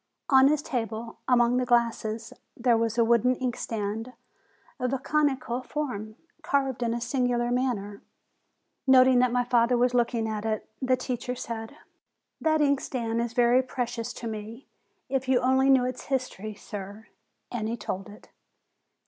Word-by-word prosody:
On 265 -1 +7
his 300 0 +1
table, 230 -3 -4
among 245 -1 +4
the 255 - +2
glasses, 230 -2 0 0.2
there 240 -1 +3
was 230 0 0
a 235 - +4
wooden 235 +2 +3
inkstand, 225 -2 -3 0.7
of 250 0 -1
a - - +2
conical 265 -4 0
form, 245 -7 -4 0.3
carved 270 -4 0
in 235 -1 0
a - - -2
singular 245 -1 0
manner. 225 -6 -1 0.9
Noting 260 -1 +6
that 250 -1 +3
my 245 0 +2
father 240 0 +3
was 250 +1 +2
looking 235 -2 +1
at 215 -1 -3
it, 220 -1 -2
the 255 -1 +2
teacher 250 0 -3
said: 225 -2 -6 0.7
128 - - -46
FEBRUARY 315 0 +3
That 300 - +2
inkstand 240 -4 -1
is 235 0 -3
very 245 +1 +4
precious 245 -2 -4
to 235 - -6
me: 220 +4 -7 0.4
if 265 -1 -1
you 260 -1 +4
only 265 +2 +3
knew 260 -2 +5
its 255 0 -5
history, 245 -6 -3
sir 205 +1 -8 0.2
!" - - -51
And 220 -3 -2
he 235 - -3
told 195 -1 -5
it. 205 - -15
240 Hz, 165 wpm, -27 LUFS, 225-255 Hz, 0.9 s, On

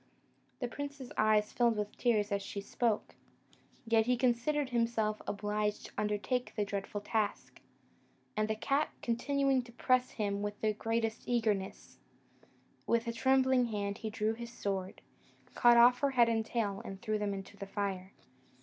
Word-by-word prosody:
The 245 - 0
prince's 285 0 -7
eyes 215 -1 +3
filled 235 -2 +2
with 210 0 -3
tears 215 -4 +1
as 200 0 0
she 200 +1 -5
spoke, 215 +2 -1 0.7
yet 225 0 +3
he 250 0 +3
considered 255 +3 +1
himself 230 -3 0
obliged 210 0 -1
to - - -10
undertake 210 +4 -1
the 210 - 0
dreadful 200 +1 -4
task; 210 0 -2 0.8
and 215 0 +1
the 220 - -1
cat 275 +7 +1
continuing 270 +2 +1
to 240 -1 -14
press 255 +1 +2
him 200 -2 -1
with 205 0 -4
the 215 -1 +1
greatest 225 +1 -2
eagerness, 220 -5 -1 0.9
with 235 0 +1
a 230 - -1
trembling 260 +1 +3
hand 205 -2 -3
he 220 - -4
drew 215 +1 0
his 235 +1 -7
sword, 195 -5 -4 0.5
cut 240 0 +6
off 245 +1 +7
her 280 - +2
head 240 -3 +4
and 225 -1 0
tail, 205 -4 -1
and 195 -1 -7
threw 215 -2 0
them 205 -1 -1
into 195 +1 -8
the 200 -1 -7
fire. 195 -2 -3
220 Hz, 160 wpm, -33 LUFS, 205-240 Hz, 0.9 s, off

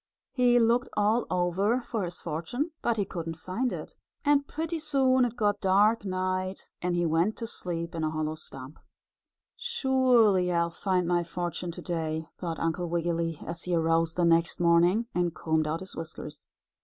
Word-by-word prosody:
He 245 -2 +4
looked 240 +2 +3
all 215 +3 +2
over 185 +6 +1
for 230 -2 -3
his 175 0 -6
fortune, 170 - -3
but 235 -1 +1
he 200 - +1
couldn't 165 -3 -5
find 220 +10 -2
it, - - -7 0.3
and 285 -1 +3
pretty 325 +1 -3
soon 265 -4 +3
it 240 -1 -3
got 205 -3 +1
dark 205 +3 +4
night 185 0 -2
and 180 0 0
he 175 0 +1
went 165 +6 +1
to 230 - -4
sleep 170 -5 -4
in 165 -1 -3
a 155 - +1
hollow 155 0 -2
stump. 135 -2 -10 0.8
"Surely, 255 - +3
I 170 -1 +3
will 170 - -3
find 180 0 0
my 175 0 +2
fortune 175 +1 -4
to - - -9
day," 160 -2 -2
thought 165 -3 -3
Uncle 165 +1 -1
Wiggily, 165 -1 -1
as 170 0 -4
he 180 -1 0
arose 165 0 +2
the 175 - +2
next 170 0 +3
morning, 175 +6 +4
and 175 -2 0
combed 160 -1 0
out 160 +3 -2
his 190 - -6
whiskers. 155 -2 -8
180 Hz, 180 wpm, -28 LUFS, 165-225 Hz, 0.8 s, He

